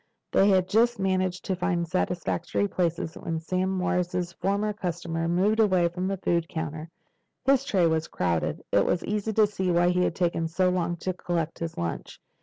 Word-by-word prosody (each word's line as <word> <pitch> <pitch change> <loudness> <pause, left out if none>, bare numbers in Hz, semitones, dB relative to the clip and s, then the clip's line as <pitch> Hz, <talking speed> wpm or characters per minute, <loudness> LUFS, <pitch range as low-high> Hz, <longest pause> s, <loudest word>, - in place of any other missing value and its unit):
They 195 - +4
had 185 -2 +3
just 235 +4 +3
managed 185 -1 0
to 190 - 0
find 175 -1 0
a - - -17
satisfactory 180 +2 -1
place 175 -4 0 0.2
when 165 -1 -3
Sam 185 +3 -1
Morris's 180 -1 -1
former 200 +4 -1
customer 170 -4 -3
moved 195 +6 +2
away 185 -5 +4
from 180 +2 -3
the 195 0 -1
food 170 -2 0
counters. 160 -1 -4 0.6
His 270 -1 +4
tray 190 -9 +2
was 160 -1 +1
crowded. 85 -2 -1
It - - +4
was 175 - 0
easy 210 +1 -1
to 215 0 +5
see 190 -3 -2
why 175 0 +3
he 180 0 +2
had 170 - 0
taken 170 -2 0
so 180 +3 +1
long 175 -1 -1
to 185 - -1
collect 170 -2 -3
his 165 -1 -4
lunch. 85 -1 -4
180 Hz, 190 wpm, -27 LUFS, 170-190 Hz, 0.6 s, to